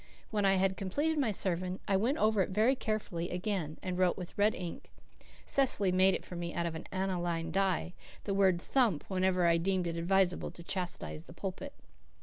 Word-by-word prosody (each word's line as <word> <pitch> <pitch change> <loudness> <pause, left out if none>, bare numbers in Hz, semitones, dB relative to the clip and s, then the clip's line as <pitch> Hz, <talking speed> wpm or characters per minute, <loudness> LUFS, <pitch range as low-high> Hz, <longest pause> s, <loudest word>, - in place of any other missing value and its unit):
When 205 -2 +1
I 195 0 +5
had 190 0 +1
completed 295 - 0
my 265 -5 +2
sermon 185 -2 -1
I 195 - +2
went 235 +10 +1
over 215 -4 +3
it - - 0
very 220 +7 +3
carefully 205 -8 -3
again 180 -4 -2
and 185 -1 -3
wrote 180 -1 +3
with 180 -2 -7
red 210 +1 +3
ink 175 -2 -7 0.6
Cecily 225 -8 +3
made 185 +1 +4
it - - -6
for 180 - -8
me 170 0 -4
out 170 - 0
of 170 - -2
an 160 - -7
aniline 175 -3 -1
dye 185 -1 0 0.3
the 200 - -2
word 190 -3 +3
"thump" 220 - +1
wherever 185 -1 +2
I 170 0 +4
deemed 185 +1 0
it 170 -1 -3
advisable 180 +1 +1
to 170 - -12
chastise 165 - -4
the - - -12
pulpit. - - -6
185 Hz, 195 wpm, -32 LUFS, 175-200 Hz, 0.6 s, I